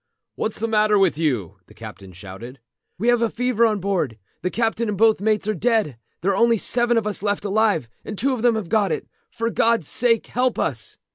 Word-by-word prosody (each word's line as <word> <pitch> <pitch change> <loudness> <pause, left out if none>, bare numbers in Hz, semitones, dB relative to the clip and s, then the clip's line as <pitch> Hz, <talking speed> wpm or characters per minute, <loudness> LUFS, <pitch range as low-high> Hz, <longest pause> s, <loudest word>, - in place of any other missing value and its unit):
"What's 215 - -3
the 230 - -2
matter 215 -1 +3
with 190 -6 +2
you?" 115 - -1
the - - -18
captain 105 -4 -10
shouted. 100 +8 -10 0.4
"We 230 +6 +1
have 240 -1 +4
got 230 -1 0
fever 240 -1 +2
on 215 -2 -1
board. 180 - -1 0.2
The 180 - -1
captain 225 +1 -1
and 205 - -2
both 220 -1 +4
mates 215 -1 0
are 215 - +1
dead. 215 - 0 0.3
There 190 +4 +1
are - - 0
only 235 +2 +3
seven 240 +2 +1
of 225 - 0
us 210 -2 -2
left 205 0 -1
alive, 205 - +1 0.2
and 205 - -7
two 265 +6 +1
of 245 - -3
them 240 -1 +3
have 215 -5 -3
got 205 -4 +2
it. 155 - -3 0.2
For 230 0 -3
God's 230 -10 +2
sake 230 -2 +1
help 250 +2 0
us!" - - -3
215 Hz, 220 wpm, -22 LUFS, 175-230 Hz, 0.4 s, have